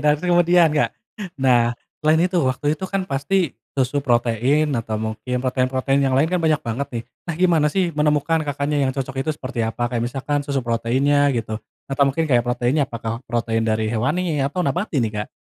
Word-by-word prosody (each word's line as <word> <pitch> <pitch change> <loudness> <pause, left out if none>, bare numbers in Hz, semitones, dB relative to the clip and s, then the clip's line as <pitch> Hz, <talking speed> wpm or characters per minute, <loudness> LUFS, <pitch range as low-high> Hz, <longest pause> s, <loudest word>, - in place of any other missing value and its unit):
Dan, 150 0 +4
kemudian, 175 0 +4
Kak, 150 - +2 0.5
nah, 120 -3 +3 0.2
selain 155 +1 +3
itu 180 -1 +1
waktu 135 +2 0
itu 175 +5 -5
kan 195 -1 -1
pasti 165 +2 0 0.2
susu 135 +2 +1
protein 125 +4 +1
atau 115 -3 -2
mungkin 110 +3 -3
protein-protein 130 +1 +1
yang 130 - +1
lain 140 - +4
kan 180 - +1
banyak 160 -2 +3
banget 120 +5 -2
nih. 115 -2 -5 0.3
Nah, 170 - -1
gimana 170 -4 +3
sih 180 +1 0
menemukan 150 +1 +1
Kakaknya 145 +1 -1
yang - - -1
cocok 135 0 -3
itu 135 - -4
seperti 130 -2 -5
apa, 115 +2 -2
kayak 120 - 0
misalkan 140 +3 -2
susu 140 -3 -2
proteinnya 130 +5 +2
gitu? 110 -1 -3 0.2
Atau 140 0 +1
mungkin 160 +4 0
kayak 125 -6 +3
proteinnya 130 +4 +1
apakah 115 0 -4
protein 115 -1 0
dari 110 0 0
hewani 150 +7 0
atau 145 +7 -1
nabati 180 -2 -1
nih, 115 -5 +1
Kak? 105 - -5
135 Hz, 185 wpm, -21 LUFS, 120-155 Hz, 0.5 s, Dan